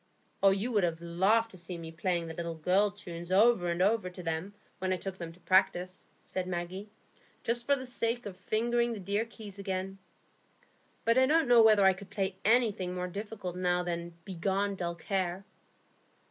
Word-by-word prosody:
"You 195 +5 +3
would 210 -4 +2
have 165 -2 0
laughed 195 +7 +2
to 185 - -12
see 175 0 -6
me 165 -1 -8
playing 170 +1 -1
the 165 - -6
little 170 0 -4
girls' 195 +5 +1
tunes 170 0 -7
over 200 -1 +5
and 170 +1 +1
over 205 -1 +2
to 180 0 -10
them, 165 +5 -3 0.2
when 185 0 -1
I 185 - +1
took 190 +1 -6
them 170 -1 -5
to 175 - -20
practise," 185 -1 +1 0.2
said 185 -1 -3
Maggie, 185 +3 -4 0.5
"just 235 +1 0
for 280 - +5
the 260 -1 -6
sake 240 -1 -1
of 200 -3 -6
fingering 235 +5 0
the 220 - -6
dear 200 +4 -1
keys 215 -4 -10
again. 195 0 -3 1.1
But 230 +2 +4
I 260 - +5
don't 320 0 +3
know 240 -1 +7
whether 215 -3 +6
I 190 - +6
could 190 +1 -11
play 195 -2 -2
anything 210 -6 +2
more 180 0 -2
difficult 200 -1 -6
now 180 -1 +1
than 170 -1 -4
'Begone, 195 +2 -1
dull 175 -3 -3
care! 185 +2 -2
190 Hz, 190 wpm, -31 LUFS, 175-215 Hz, 1.1 s, know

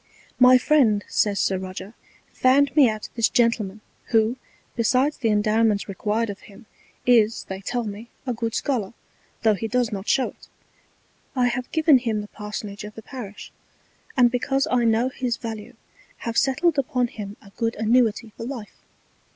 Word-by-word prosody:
My 255 0 +8
Friend, 250 -7 +3
says 205 -2 +1
Sir 190 -1 +1
Roger, 190 +2 -7 0.4
found 275 +3 +3
me 280 -6 +6
out 215 -1 -5
this 230 -1 +2
Gentleman, 220 -4 +1 0.2
who, 225 +1 +2 0.4
besides 255 +5 +2
the 230 - 0
Endowments 215 0 +2
required 210 +3 -1
of 200 - -10
him, 210 +3 -16 0.4
is, 230 -3 +4
they 190 0 -5
tell 240 +4 -2
me, 215 +2 -7 0.2
a 250 - -1
good 230 -1 -3
Scholar, 235 -7 -1 0.5
tho' 220 -1 +5
he 215 +3 -3
does 245 0 0
not 195 -1 -5
show 265 -2 +2
it. - - -17 0.9
I 250 -1 +3
have 250 +1 -4
given 315 -4 +5
him 225 -4 -1
the 205 - -8
Parsonage 210 -1 -7
of 210 0 -9
the 225 - -10
Parish; 215 -7 -9 0.7
and 245 -2 +5
because 270 +2 0
I 245 -1 +3
know 230 +3 +2
his 250 -2 -2
Value 225 +1 -7 0.5
have 230 -1 -3
settled 285 +5 +2
upon 250 -2 0
him 205 -3 -8
a 200 - -17
good 230 0 -1
Annuity 225 0 +1
for 230 - -7
Life. 240 -5 -8
230 Hz, 165 wpm, -24 LUFS, 210-250 Hz, 0.9 s, My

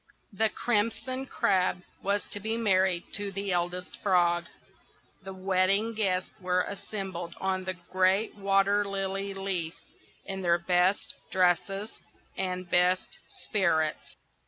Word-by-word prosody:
THE 220 +2 +2
Crimson 230 +4 -1
Crab 185 -4 +1 0.2
was 200 +1 0
to 205 - -3
be 220 +3 -1
married 190 -5 +2
to 205 -1 -2
the 195 0 -2
Eldest 180 +1 -2
Frog. 175 -3 +3 0.8
The 195 0 -8
wedding 190 +3 +2
guests 190 -4 0
were 180 -1 +1
assembled 195 -4 -5
on 190 -1 -1
the 185 0 -2 0.2
great 190 +3 +3
water 200 0 +2
lily 195 0 -3
leaf, 185 -4 -2 0.5
in 195 0 -4
their 170 -1 +3
best 180 +3 +1 0.2
dresses 190 +3 +1 0.4
and 185 -1 -2
best 180 +1 +2 0.2
spirits. 160 -6 0
190 Hz, 120 wpm, -29 LUFS, 180-200 Hz, 0.8 s, Frog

